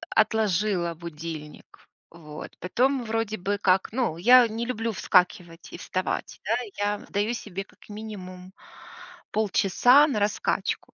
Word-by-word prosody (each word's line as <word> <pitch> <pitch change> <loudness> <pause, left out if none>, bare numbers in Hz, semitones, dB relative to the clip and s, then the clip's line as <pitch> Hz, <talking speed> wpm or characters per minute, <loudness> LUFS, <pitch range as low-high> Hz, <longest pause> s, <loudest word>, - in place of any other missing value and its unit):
отложила 200 -5 +1
будильник, 160 -2 -9 0.2
вот. 155 -2 -10
Потом, 255 +7 +1
вроде 220 -1 -2
бы 200 +3 -2
как, 190 0 +2
ну, 230 -9 -1
я 245 +5 +7
не 225 +2 -4
люблю 230 -2 -2
вскакивать 180 -3 0
и - - -6
вставать, 185 +1 -3
да. 220 - +1 0.2
Я 205 0 0
отдаю 205 +3 -2
себе 195 -4 -5
как - - -22
минимум 190 -4 -9 0.8
полчаса 220 +7 +4
на 235 -8 -1
раскачку. 205 +1 -1
205 Hz, 125 wpm, -26 LUFS, 180-225 Hz, 0.8 s, я